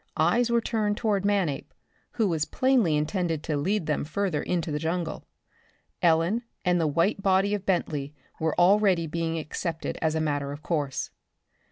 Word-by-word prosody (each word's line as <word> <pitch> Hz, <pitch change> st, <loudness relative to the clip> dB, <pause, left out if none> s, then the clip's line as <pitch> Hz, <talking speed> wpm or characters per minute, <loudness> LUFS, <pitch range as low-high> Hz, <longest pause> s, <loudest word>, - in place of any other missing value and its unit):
Eyes 225 Hz, +10 st, +3 dB
were 235 Hz, 0 st, +3 dB
turned 215 Hz, -3 st, -1 dB
toward 210 Hz, -4 st, 0 dB
Manape, 185 Hz, -9 st, 0 dB, 0.4 s
who 220 Hz, -3 st, +1 dB
was 160 Hz, -4 st, 0 dB
plainly 250 Hz, -, +2 dB
intended 160 Hz, 0 st, -1 dB
to 155 Hz, -, -1 dB
lead 180 Hz, +6 st, 0 dB
them 150 Hz, -, 0 dB
further 170 Hz, +1 st, -1 dB
into 170 Hz, -3 st, -2 dB
the 150 Hz, -, -1 dB
jungle. 165 Hz, +1 st, -3 dB, 0.7 s
Ellen 170 Hz, +7 st, +3 dB, 0.2 s
and 180 Hz, -1 st, +3 dB
the 160 Hz, -, +2 dB
white 170 Hz, +7 st, +1 dB
body 195 Hz, +1 st, +3 dB
of 205 Hz, -2 st, -3 dB
Bentley 150 Hz, -6 st, -1 dB, 0.2 s
were 160 Hz, +1 st, 0 dB
already 190 Hz, -1 st, +4 dB
being 165 Hz, +1 st, -2 dB
accepted 160 Hz, +1 st, -4 dB
as 160 Hz, -1 st, +1 dB
a -, -, +1 dB
matter 145 Hz, -2 st, -1 dB
of 145 Hz, +2 st, -8 dB
course. 145 Hz, -5 st, -2 dB
170 Hz, 165 wpm, -27 LUFS, 155-200 Hz, 0.7 s, already